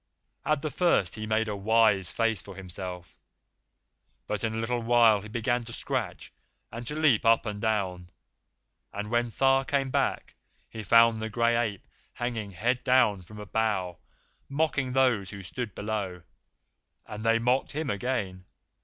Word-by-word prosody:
At 155 -1 +1
the 155 - -2
first 170 - +2
he 110 -1 -5
made 110 0 +1
a 105 - -2
wise 105 -3 +3
face 115 -3 +1
for 100 - -11
himself, 90 -1 -7 1.1
but 105 0 -3
in 110 0 -1
a - - -3
little 115 +2 -1
while 115 -3 +5
he 105 - -9
began 120 +2 -1
to 115 - -8
scratch - - -4 0.4
and 115 0 -7
to 150 - -4
leap 155 -8 +3
up 115 +1 +4
and 105 -1 -4
down, 95 -5 -1 0.8
and 105 +2 -5
when 120 0 +1
Tha 135 +4 +3
came 135 -2 0
back - - -1 0.3
he 110 - -8
found 115 +1 +5
the 110 - -3
Gray 115 +1 +2
Ape 110 -5 -2 0.3
hanging, 115 -4 -3
head 120 +7 -1
down, 125 -7 +3
from 105 +4 -13
a 105 - -7
bough, 100 -5 -1 0.5
mocking 140 -3 0
those 125 -8 +2
who 100 -1 -9
stood 105 +4 -5
below; 100 -4 -4 0.8
and 105 0 -7
they 115 0 +4
mocked 125 +3 0
him 150 -2 -2
again. 100 -5 -3
110 Hz, 165 wpm, -28 LUFS, 100-120 Hz, 1.1 s, while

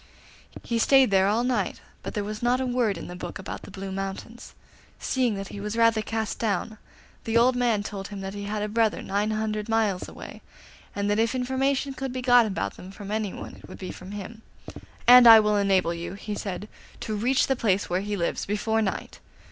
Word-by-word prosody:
He 235 -1 -1
stayed 265 -1 +5
there 190 0 +4
all 220 +4 +2
night, 250 0 -1 0.2
but - - -7
there 210 - -1
was 210 +1 -6
not 245 +1 +2
a 260 - -1
word 245 -5 0
in - - -7
the 180 - -8
book 175 -1 -6
about 190 - -7
the - - -11
Blue 195 0 -7
Mountains. 195 +4 -6 0.4
Seeing 250 -5 0
that 195 0 -6
he 205 - -8
was 210 +2 -4
rather 230 -1 +4
cast 220 -1 -3
down, 215 -1 -2 0.4
the 225 0 +1
old 250 +2 +4
man 235 -4 +1
told 200 -1 -6
him 205 -1 -8
that 195 0 -5
he 205 0 -6
had 210 0 -2
a - - -1
brother 220 0 +1
nine 205 +2 -1
hundred 215 0 -2
miles 215 -5 0
away, - - -10 0.5
and 200 0 -1
that 205 - +1
if 230 +3 +1
information 265 +2 0
could 265 -1 -4
be 255 0 -5
got 245 -2 +6
about 100 - -3
them 185 - -10
from 200 +1 -9
anyone 215 -3 -4
it - - -14
would - - -9
be 185 - -6
from 185 - -11
him; 205 +2 -8 0.7
'and 245 0 +10
I 225 -1 +11
will 210 -1 +2
enable 190 -4 +2
you,' 170 +3 -6
he 210 +1 -6
said, 205 0 -5 0.3
'to 215 - -3
reach 250 +5 +2
the 270 - +1
place 205 -5 +1
where 180 +2 0
he 205 0 -3
lives 170 -2 -2
before 220 +2 0
night. 195 -3 -3
215 Hz, 220 wpm, -26 LUFS, 200-235 Hz, 0.7 s, I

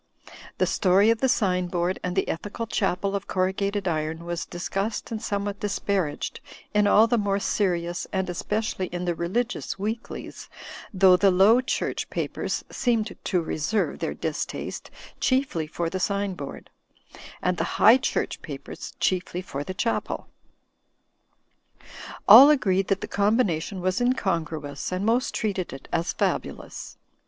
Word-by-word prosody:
The - - +3
story 195 +3 +4
of 230 - 0
the 265 - +2
sign 180 -6 +1
board 175 +1 -1
and 180 0 -3
the 190 - +1
ethical 205 +7 -4
chapel 200 -2 -1
of 200 - -4
corrugated 195 +2 -1
iron 160 0 -2
was 170 0 -4
discussed 195 +6 -3
and 220 -1 -3
somewhat 200 0 -2
dis 205 -1 -2
paraged 190 -7 -2 0.3
in 210 0 +4
all 215 +2 +6
the 230 0 +1
more 200 -1 +1
serious 175 -4 -1
and 190 -1 -1
especially 190 +2 -2
in 175 +1 -4
the 175 - +1
religious 195 +10 -2
weeklies, 220 +4 -5 0.4
though 185 -2 +6
the 200 +1 +4
Low 200 +7 +5
Church 260 - -2
papers - - -3
seemed 230 -3 0
to 180 -3 +1
reserve 160 +7 -1
their - - -3
distaste - - -4 0.3
chiefly 255 - +1
for 170 +2 -3
the 185 +3 -3
sign 200 +1 0
board; 145 -6 -8 0.7
and 180 -1 0
the 165 - -2
High 230 +4 +8
Church - - -2
papers - - -8
chiefly 180 -1 -1
for 140 -5 -5
the 185 +4 -6
Chapel. 230 +4 -2 2.0
All 245 +8 +11
agreed 195 -10 +2
that 195 -1 0
the - - -4
combination 200 -4 +1
was 185 +1 0
incon 205 -9 +1
gruous, 145 -2 -6
and 185 +2 -2
most 235 +3 +1
treated 195 -4 -2
it 135 0 -10
as 170 +1 0
fabulous. - - -3
190 Hz, 150 wpm, -25 LUFS, 175-210 Hz, 2.0 s, All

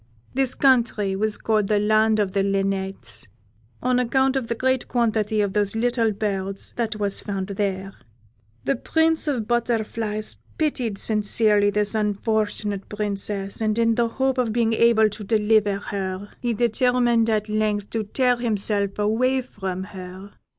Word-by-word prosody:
This 265 -1 +1
country 230 -7 +2
was 215 +1 -1
called 215 -2 +1
the 210 - +2
Land 215 +1 +3
of 205 -3 0
the 195 - +1
Linnets, 195 - -2 0.6
on 250 0 +2
account 265 +2 +2
of 260 -4 -1
the 235 - -2
great 260 +1 0
quantity 220 -3 +1
of 200 -2 -1
those 205 0 0
little 230 -1 +1
birds 195 -2 -3
that 230 -2 -1
was 205 -2 -1
found 195 -1 -4
there. 195 -1 -2 0.7
The 135 - +1
Prince 320 0 +1
of 290 - +1
the 240 - -2
Butterflies 220 -2 -2 0.2
pitied 255 -9 -1
sincerely 210 -1 +2
this 210 +1 0
unfortunate 210 -1 -1
Princess, 205 -1 -3
and, 215 0 +1
in 230 0 +3
the 235 +1 +1
hope 265 +2 0
of 240 -3 +1
being 230 0 +1
able 225 -1 +4
to 210 0 -6
deliver 210 -1 +2
her, 195 0 -4
he 240 -2 -1
determined 240 0 +2
at 215 -1 0
length 210 -1 -1
to 225 - -1
tear 250 +3 +1
himself 205 -3 -1
away 250 +5 +1
from 190 -6 -5
her. 190 0 -9
215 Hz, 155 wpm, -23 LUFS, 200-235 Hz, 0.7 s, able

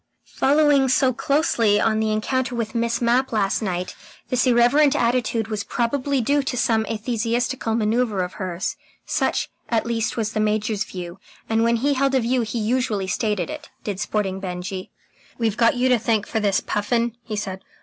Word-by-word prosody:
Following 285 -1 +4
so 260 0 +3
closely 235 -7 +2
on 220 0 +2
the 220 0 +1
encounter 250 +4 -1
with 225 -2 -3
Miss 235 0 0
Mapp 245 +3 +2
last 205 -2 +1
night, 180 -3 -3 0.3
this 255 +1 +2
irreverent 260 +5 +4
attitude 235 -3 +1
was 210 -2 -2
probably 255 +5 0
due 285 +5 +2
to 265 -2 -3
some 220 -2 +1
atheistical 230 +1 -1
manoeuvre 220 -1 +1
of 180 - -9
hers. 185 +1 -3 0.3
Such, - - 0 0.2
at 230 -1 +1
least, 230 0 -1
was 220 -1 -1
the - - -1
Major's 215 0 0
view, 180 0 -8 0.3
and 225 0 +2
when 235 0 +3
he 280 +5 +1
held 270 0 +1
a - - +4
view 245 +1 +1
he 225 +1 -3
usually 225 -3 0
stated 200 -2 -1
it, - - -8
did 200 -3 -4
Sporting 200 -2 -1
Benjy. 185 0 -5 0.5
"We've 225 -3 0
got 230 +1 +3
you 250 +1 +2
to 250 -2 +4
thank 220 -2 +1
for 225 - -2
this, 200 -3 +1
Puffin," 230 +3 -1
he 215 - -5
said. 190 -2 -5
230 Hz, 180 wpm, -22 LUFS, 210-250 Hz, 0.5 s, Following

